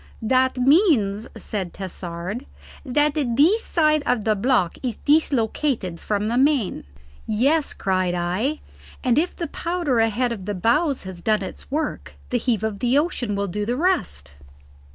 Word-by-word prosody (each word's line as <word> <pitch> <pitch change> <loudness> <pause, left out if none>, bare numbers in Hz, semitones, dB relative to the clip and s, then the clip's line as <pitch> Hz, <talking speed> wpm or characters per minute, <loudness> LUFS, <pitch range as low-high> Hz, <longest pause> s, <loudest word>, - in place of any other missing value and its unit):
"That 260 +3 +2
means," 250 - +3
said 190 -5 -4
Tassard, 185 +5 -6 0.4
"that 295 +2 +1
this 300 - +2
side 305 -2 +2
of 225 -4 +1
the 215 -1 +3
block 205 -5 +1
is 245 -4 -3
dislocated 255 - +1
from 210 0 -1
the 240 +3 +1
main." 270 - +1 0.4
"Yes," 275 +8 +1
cried 185 -2 0
I. 185 - -1 0.4
"And 255 +2 +3
if 345 +3 -1
the 340 - -3
powder 335 -9 -1
ahead 225 +2 +1
of 200 -5 -5
the 205 0 -3
bows 265 - +1
has 185 -2 -8
done 215 0 +1
its - - -9
work, 300 +2 -3 0.2
the 250 - +2
heave 230 -3 0
of 215 -2 -2
the 250 +2 +2
ocean 265 - 0
will 200 0 -1
do 210 +3 -3
the 240 +4 -1
rest." 205 - 0
240 Hz, 155 wpm, -23 LUFS, 200-290 Hz, 0.4 s, means